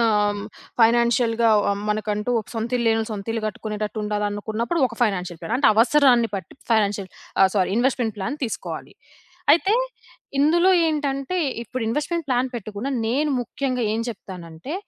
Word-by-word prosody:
ఆహ్, 225 Hz, -2 st, +3 dB, 0.2 s
హ్మ్, 200 Hz, -, -5 dB, 0.4 s
ఫైనాన్షియల్‌గా 235 Hz, 0 st, +4 dB, 0.2 s
ఆహ్, 200 Hz, 0 st, -1 dB
మనకంటూ 210 Hz, +2 st, -1 dB
ఒక -, -, -14 dB
సొంత 225 Hz, +1 st, -2 dB
ఇల్లు 235 Hz, -1 st, -1 dB
లేనోళ్ళు 225 Hz, 0 st, +1 dB
సొంత 200 Hz, -2 st, -6 dB
ఇల్లు 225 Hz, -1 st, -2 dB
గట్టుకునేటట్టు 215 Hz, +1 st, -4 dB
ఉండాలనుకున్నప్పుడు, 210 Hz, +7 st, -2 dB
ఒక 230 Hz, -, -10 dB
ఫైనాన్షియల్ 180 Hz, -5 st, -1 dB
ప్లాన్. 225 Hz, -, -3 dB
అంటే 280 Hz, -, +3 dB
అవసరాన్ని 245 Hz, 0 st, +5 dB
పట్టి 190 Hz, -4 st, -6 dB, 0.2 s
ఫైనాన్షియల్ 205 Hz, -3 st, +1 dB, 0.3 s
ఆహ్, 190 Hz, -, +7 dB
సారీ 185 Hz, -1 st, +2 dB
ఇన్‌వెస్ట్‌మెంట్ 240 Hz, -3 st, +1 dB
ప్లాన్ 280 Hz, +10 st, -3 dB
తీసుకోవాలి. 230 Hz, -, -5 dB, 0.6 s
అయితే 380 Hz, +5 st, +3 dB, 0.7 s
ఇందులో 340 Hz, +6 st, +4 dB, 0.2 s
ఏంటంటే, 290 Hz, +1 st, -1 dB, 0.3 s
ఇప్పుడు 245 Hz, +2 st, -5 dB
ఇన్‌వెస్ట్‌మెంట్ 300 Hz, +6 st, -2 dB
ప్లాన్ 255 Hz, 0 st, +1 dB
పెట్టకుండా 220 Hz, +3 st, -4 dB, 0.2 s
నేను 290 Hz, +6 st, +1 dB
ముఖ్యంగా 255 Hz, 0 st, -2 dB
ఏం 225 Hz, -, -1 dB
చెప్తానంటే, 185 Hz, -, -8 dB
230 Hz, 145 wpm, -23 LUFS, 210-260 Hz, 0.7 s, ఆహ్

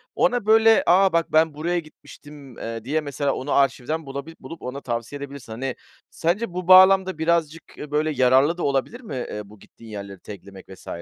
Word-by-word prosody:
Ona, 245 Hz, -4 st, +1 dB
böyle, 225 Hz, +1 st, +5 dB
"A, 190 Hz, +2 st, +4 dB
bak, 165 Hz, -1 st, 0 dB
ben 160 Hz, 0 st, +3 dB
buraya 170 Hz, +4 st, -1 dB
gitmiştim." 145 Hz, -4 st, -14 dB
eee, 115 Hz, -1 st, -6 dB
diye 150 Hz, +6 st, -1 dB
mesela 140 Hz, -1 st, -2 dB
onu 140 Hz, +3 st, -5 dB
arşivden 140 Hz, +3 st, 0 dB
bulabil 140 Hz, +4 st, -7 dB
bulup 165 Hz, -, -10 dB
ona 130 Hz, +3 st, -6 dB
tavsiye 120 Hz, +2 st, -4 dB
edebilirsin. 140 Hz, -4 st, -9 dB
Hani, 125 Hz, +2 st, -4 dB, 0.3 s
sence 175 Hz, +4 st, -2 dB
bu 180 Hz, -1 st, -5 dB
bağlamda 190 Hz, -1 st, +6 dB
birazcık, 165 Hz, -1 st, 0 dB
eee, 150 Hz, -, -9 dB
böyle 155 Hz, +1 st, 0 dB
yararlı 135 Hz, +4 st, +3 dB
da 175 Hz, -, -4 dB
olabilir 140 Hz, -, -1 dB
mi? 210 Hz, -, -8 dB
Eee, 120 Hz, -4 st, -5 dB
bu 105 Hz, 0 st, -16 dB
gittiğin 115 Hz, +2 st, -16 dB
yerleri 100 Hz, -2 st, -8 dB
tag'lemek 100 Hz, -1 st, -12 dB
vs. 95 Hz, -, -14 dB
150 Hz, 185 wpm, -23 LUFS, 130-170 Hz, 0.3 s, bağlamda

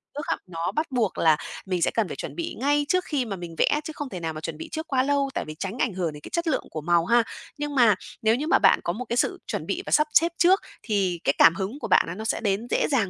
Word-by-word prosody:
trước 295 Hz, -, -4 dB
á, -, -, 0 dB
nó 165 Hz, -1 st, -3 dB
bắt 310 Hz, -1 st, -2 dB
buộc 235 Hz, -6 st, 0 dB
là 160 Hz, -2 st, +4 dB, 0.3 s
mình 185 Hz, -2 st, -2 dB
sẽ -, -, +2 dB
cần 225 Hz, -4 st, 0 dB
phải -, -, -6 dB
chuẩn -, -, -6 dB
bị 340 Hz, -1 st, -4 dB
ngay 290 Hz, +2 st, +2 dB
trước 365 Hz, +1 st, +2 dB
khi 280 Hz, -5 st, -1 dB
mà 200 Hz, -4 st, -4 dB
mình 175 Hz, -2 st, -8 dB
vẽ, 295 Hz, -, +3 dB
chứ 315 Hz, -, -6 dB
không 290 Hz, -2 st, -5 dB
thể 185 Hz, -, -6 dB
nào 165 Hz, -1 st, -3 dB
mà 155 Hz, -, -7 dB
chuẩn 160 Hz, -2 st, -5 dB
bị -, -, -8 dB
trước 315 Hz, +1 st, -4 dB
quá 260 Hz, -3 st, +2 dB
lâu, 280 Hz, 0 st, +1 dB
tại -, -, -2 dB
vì 155 Hz, -, -8 dB
tránh 195 Hz, +4 st, -4 dB
ảnh 230 Hz, -, +1 dB
hưởng 175 Hz, -4 st, -2 dB
đến 150 Hz, -, -10 dB
cái -, -, -10 dB
chất 340 Hz, -1 st, -1 dB
lượng -, -, +1 dB
của 155 Hz, -, -4 dB
màu 170 Hz, +1 st, +2 dB
ha. 235 Hz, +4 st, +4 dB, 0.3 s
Nhưng 295 Hz, 0 st, -4 dB
mà 235 Hz, -6 st, +6 dB, 0.3 s
nếu 220 Hz, +1 st, +3 dB
như 300 Hz, +5 st, -3 dB
mà 370 Hz, -, +4 dB
bạn -, -, +5 dB
có 170 Hz, -, -1 dB
một 245 Hz, +6 st, -5 dB
cái 235 Hz, -, -2 dB
sự -, -, +1 dB
chuẩn -, -, -3 dB
bị -, -, -2 dB
và -, -, -6 dB
sắp 300 Hz, 0 st, +4 dB
xếp 335 Hz, +2 st, +5 dB
trước, 375 Hz, +3 st, +5 dB, 0.2 s
thì 195 Hz, -5 st, 0 dB
cái 140 Hz, -, +3 dB
cảm 165 Hz, -, +7 dB
hứng 195 Hz, +10 st, -4 dB
của -, -, -4 dB
bạn -, -, +5 dB
nó 165 Hz, -, -5 dB
nó 220 Hz, +3 st, -6 dB
sẽ -, -, 0 dB
đến 210 Hz, +1 st, -1 dB
dễ -, -, +1 dB
dàng 225 Hz, -9 st, +2 dB
225 Hz, 310 wpm, -25 LUFS, 175-290 Hz, 0.3 s, cảm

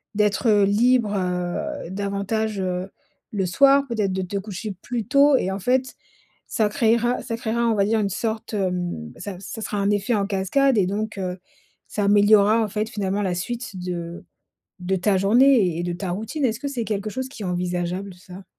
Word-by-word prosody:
d'être, 210 Hz, +2 st, +1 dB
heu, 205 Hz, -1 st, +5 dB
libre, 225 Hz, +2 st, +3 dB
heu, 180 Hz, -, -2 dB
davantage, 200 Hz, +2 st, -2 dB
heu, 185 Hz, +1 st, -2 dB, 0.4 s
le 195 Hz, -3 st, -1 dB
soir, 275 Hz, +7 st, +5 dB
peut-être 215 Hz, -5 st, -1 dB
de 190 Hz, 0 st, -1 dB
te 200 Hz, +3 st, -4 dB
coucher 200 Hz, 0 st, -5 dB
plus 240 Hz, -3 st, -3 dB
tôt 280 Hz, +1 st, +5 dB
et 185 Hz, -, -1 dB
en 195 Hz, -, -3 dB
fait, 255 Hz, +5 st, 0 dB, 0.5 s
ça 215 Hz, -2 st, +1 dB
créera 235 Hz, +3 st, +2 dB
ça 230 Hz, -, -4 dB
créera, 235 Hz, +1 st, 0 dB
on 225 Hz, -, +2 dB
va 200 Hz, -1 st, +2 dB
dire 220 Hz, +1 st, +1 dB
une 200 Hz, -, 0 dB
sorte, 220 Hz, +2 st, -3 dB
hem, 180 Hz, -, -2 dB
ça 185 Hz, 0 st, -6 dB
ça 220 Hz, +3 st, -7 dB
sera 210 Hz, -, -3 dB
un 200 Hz, -, +1 dB
effet 205 Hz, +4 st, 0 dB
en 200 Hz, -1 st, 0 dB
cascade 215 Hz, +7 st, +2 dB
et 185 Hz, -3 st, +3 dB
donc, 215 Hz, +1 st, -3 dB
heu, 185 Hz, -1 st, -3 dB, 0.5 s
ça 205 Hz, -, -2 dB
améliorera 205 Hz, +2 st, +5 dB
en 215 Hz, -, -1 dB
fait, 215 Hz, +2 st, -2 dB
finalement 205 Hz, -3 st, -2 dB
la 185 Hz, -, 0 dB
suite 235 Hz, +2 st, -5 dB
de 175 Hz, -1 st, -5 dB, 0.6 s
de 180 Hz, +2 st, -1 dB
ta 190 Hz, +2 st, +2 dB
journée 215 Hz, -3 st, +4 dB
et -, -, -1 dB
de 175 Hz, -, -2 dB
ta 180 Hz, 0 st, -4 dB
routine. 220 Hz, -, -3 dB
Est-ce 230 Hz, -3 st, 0 dB
que 280 Hz, -, -3 dB
c'est 245 Hz, -5 st, -3 dB
quelque 210 Hz, 0 st, -3 dB
chose 260 Hz, +2 st, -4 dB
qui 230 Hz, -5 st, -10 dB
est -, -, -3 dB
envisageable 180 Hz, +1 st, -2 dB
ça? 180 Hz, +1 st, -12 dB
205 Hz, 195 wpm, -23 LUFS, 185-230 Hz, 0.6 s, heu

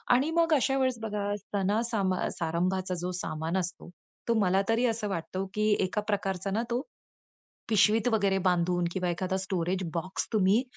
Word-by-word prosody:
आणि 275 Hz, +6 st, +2 dB
मग 335 Hz, 0 st, +3 dB
अशा 270 Hz, -1 st, +2 dB
वेळेस 260 Hz, -2 st, +1 dB
बघा 210 Hz, -2 st, -2 dB
सणा-सारंभा 205 Hz, 0 st, 0 dB
अ, -, -, -1 dB
सारंभाचा 180 Hz, +3 st, 0 dB
जो 180 Hz, +1 st, -2 dB
सामान 160 Hz, +3 st, -2 dB
असतो, 180 Hz, -1 st, -4 dB, 0.4 s
तो 235 Hz, -, +3 dB
मला 190 Hz, -1 st, +3 dB
तरी 230 Hz, +2 st, +3 dB
असं 225 Hz, -2 st, -1 dB
वाटतो, 185 Hz, +1 st, -3 dB
की 215 Hz, 0 st, +2 dB
एका 185 Hz, +3 st, -2 dB
प्रकारचा 195 Hz, -2 st, -1 dB
ना, 220 Hz, +4 st, 0 dB
तो 240 Hz, +2 st, +1 dB, 0.9 s
पिशवीत 215 Hz, +2 st, +4 dB
वगैरे 200 Hz, -3 st, +2 dB
बांधून 175 Hz, 0 st, +1 dB
किंवा 180 Hz, -1 st, -1 dB
एखादा 185 Hz, +2 st, -1 dB
स्टोरेज 185 Hz, -1 st, -1 dB
बॉक्स 180 Hz, +3 st, -3 dB
तुम्ही 205 Hz, +3 st, +4 dB
195 Hz, 160 wpm, -29 LUFS, 185-220 Hz, 0.9 s, पिशवीत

